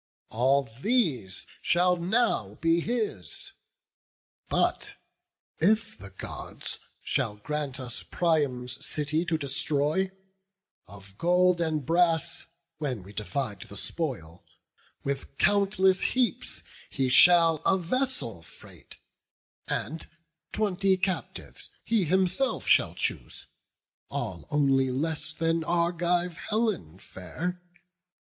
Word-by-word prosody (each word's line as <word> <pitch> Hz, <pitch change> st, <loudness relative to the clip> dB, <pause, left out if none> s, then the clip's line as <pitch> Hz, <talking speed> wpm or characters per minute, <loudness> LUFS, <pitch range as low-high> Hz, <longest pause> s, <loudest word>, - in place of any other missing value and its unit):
All 135 Hz, +5 st, +3 dB, 0.2 s
these 145 Hz, -, +1 dB, 0.2 s
shall 180 Hz, +1 st, +3 dB
now 175 Hz, -, +1 dB
be 165 Hz, +4 st, +2 dB
his: 215 Hz, -, -2 dB, 1.0 s
but -, -, +1 dB, 0.6 s
if 210 Hz, +6 st, +2 dB
the 100 Hz, +1 st, -11 dB
Gods 95 Hz, -, -6 dB, 0.2 s
Shall 105 Hz, -, 0 dB
grant 140 Hz, +5 st, -3 dB
us 125 Hz, -3 st, -4 dB
Priam's 135 Hz, -7 st, 0 dB
city 155 Hz, +3 st, -1 dB
to 165 Hz, -2 st, +1 dB
destroy, 150 Hz, +5 st, 0 dB, 0.8 s
Of 100 Hz, 0 st, -13 dB
gold 180 Hz, 0 st, +4 dB
and 155 Hz, -4 st, 0 dB
brass, 165 Hz, +1 st, +2 dB, 0.3 s
when 130 Hz, -10 st, -2 dB
we 100 Hz, +3 st, -12 dB
divide 105 Hz, -1 st, -3 dB
the 100 Hz, -, -9 dB
spoil, 95 Hz, -, -4 dB, 0.6 s
With 140 Hz, 0 st, -4 dB
countless 195 Hz, -2 st, +3 dB
heaps 245 Hz, -8 st, 0 dB, 0.3 s
he 135 Hz, -1 st, 0 dB
shall 165 Hz, +5 st, +6 dB
a 190 Hz, +5 st, +2 dB
vessel 180 Hz, -, -1 dB
freight, -, -, -12 dB, 0.7 s
And 160 Hz, +1 st, -3 dB, 0.4 s
twenty 195 Hz, -2 st, +2 dB
captives 185 Hz, 0 st, -3 dB
he 220 Hz, -5 st, +2 dB
himself 190 Hz, -, +1 dB
shall -, -, +4 dB
choose, -, -, -3 dB, 0.6 s
All -, -, -4 dB
only 135 Hz, -3 st, +3 dB
less 155 Hz, +5 st, -1 dB
than 165 Hz, 0 st, 0 dB
Argive 175 Hz, 0 st, +1 dB
Helen 210 Hz, -, -1 dB
fair. 160 Hz, -, -5 dB
165 Hz, 100 wpm, -28 LUFS, 130-180 Hz, 1.0 s, shall